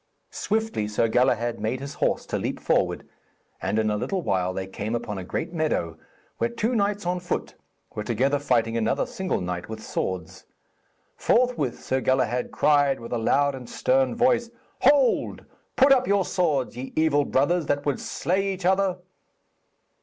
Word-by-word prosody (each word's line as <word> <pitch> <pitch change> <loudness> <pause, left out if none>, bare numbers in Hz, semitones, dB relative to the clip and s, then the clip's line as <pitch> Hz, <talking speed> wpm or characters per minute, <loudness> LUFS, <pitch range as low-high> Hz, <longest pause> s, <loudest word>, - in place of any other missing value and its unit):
Swiftly 220 - -1
Sir 105 +2 +1
Galahad 120 0 +1
made 110 +4 -2
his 140 +1 -6
horse - - 0
to - - -2
leap - - -3
forward, - - 0 0.5
and 105 - -1
in 110 -1 +2
a 105 - 0
little 185 - -2
while 90 -6 0
they 95 +1 -4
came 105 +4 -4
upon 105 -4 -4
a - - -5
great 125 - -4
meadow, 155 - -1 0.4
where 235 - +1
two 235 +1 -1
knights 205 -3 0
on 180 +1 0
foot 175 - -3 0.4
were 105 - -4
together 135 +6 +1
fighting 115 -5 +1
another 115 -1 +1
single 190 0 -2
knight 90 +1 -4
with 110 -1 -7
swords. 90 -3 -4 0.7
Forthwith 240 - +1
Sir 130 0 0
Galahad 125 -2 +1
cried 145 -2 +3
with 115 +1 -7
a 120 - 0
loud 140 +5 +2
and 130 -3 -8
a - - -12
stern 130 -1 +2
voice, 240 -1 +2 0.3
'Hold, 275 -1 +3 0.3
put 275 +1 +5
up 255 -1 +5
your 200 -2 +2
swords, 150 -10 0
ye 130 +2 -7
evil 155 -2 +3
brothers, 155 +5 +1
that 145 0 0
would 145 -2 0
slay 195 +3 -1
each 190 -1 -5
other!' 190 0 +2
140 Hz, 170 wpm, -25 LUFS, 115-190 Hz, 0.7 s, put